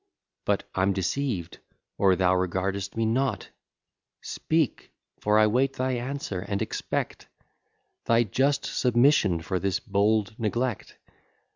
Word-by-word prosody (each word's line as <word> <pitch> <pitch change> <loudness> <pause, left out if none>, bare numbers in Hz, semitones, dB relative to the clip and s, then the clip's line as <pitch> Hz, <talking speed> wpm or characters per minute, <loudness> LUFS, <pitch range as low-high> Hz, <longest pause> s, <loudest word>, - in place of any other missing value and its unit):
But - - 0
I'm 95 +1 +2
deceived, 95 - -2 0.4
or 95 -2 +5
thou 90 0 +3
regard'st 95 +2 -2
me 115 - +1
not; 130 +4 0 0.7
Speak, 155 -5 -1 0.3
for 105 0 +2
I 110 - +6
wait 130 +5 +2
thy 130 0 -1
answer, 125 -5 -3
and 100 +1 -3
expect - - -3 0.8
Thy 115 +1 +4
just 135 +6 +1
submission 120 - +3
for 95 0 -1
this 95 -1 0
bold 100 +1 +1
neglect. 120 +1 -2
105 Hz, 120 wpm, -26 LUFS, 95-130 Hz, 0.8 s, I